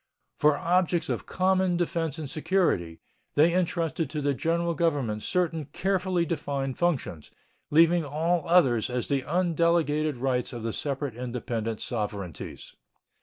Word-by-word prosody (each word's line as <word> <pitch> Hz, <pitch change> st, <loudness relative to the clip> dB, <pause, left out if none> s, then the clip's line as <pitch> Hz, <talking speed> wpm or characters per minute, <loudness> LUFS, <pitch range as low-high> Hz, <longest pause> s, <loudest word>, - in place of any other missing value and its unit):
For 150 Hz, -1 st, +3 dB
objects 175 Hz, +1 st, +1 dB
of -, -, -3 dB
common 185 Hz, -1 st, +2 dB
defense 165 Hz, -3 st, -1 dB
and 155 Hz, -2 st, -5 dB
security, 150 Hz, -, 0 dB, 0.4 s
they 160 Hz, +4 st, +5 dB
intrusted 170 Hz, -4 st, 0 dB
to 150 Hz, 0 st, -3 dB
the 145 Hz, 0 st, +1 dB
General 170 Hz, +4 st, 0 dB
Government 145 Hz, -10 st, 0 dB
certain 165 Hz, -, -1 dB
carefully 185 Hz, +3 st, 0 dB
defined 140 Hz, -5 st, -3 dB
functions, 145 Hz, -, -1 dB, 0.4 s
leaving 165 Hz, +2 st, +5 dB
all 160 Hz, +4 st, 0 dB
others 130 Hz, -11 st, +4 dB
as 125 Hz, -1 st, -2 dB
the 140 Hz, -2 st, +1 dB
undelegated 165 Hz, -3 st, +1 dB
rights 125 Hz, 0 st, -1 dB
of 120 Hz, -2 st, -6 dB
the 115 Hz, -1 st, -2 dB
separate 140 Hz, -2 st, -3 dB
independent 115 Hz, -2 st, -3 dB
sovereignties. 100 Hz, -, -5 dB
155 Hz, 130 wpm, -27 LUFS, 130-170 Hz, 0.4 s, they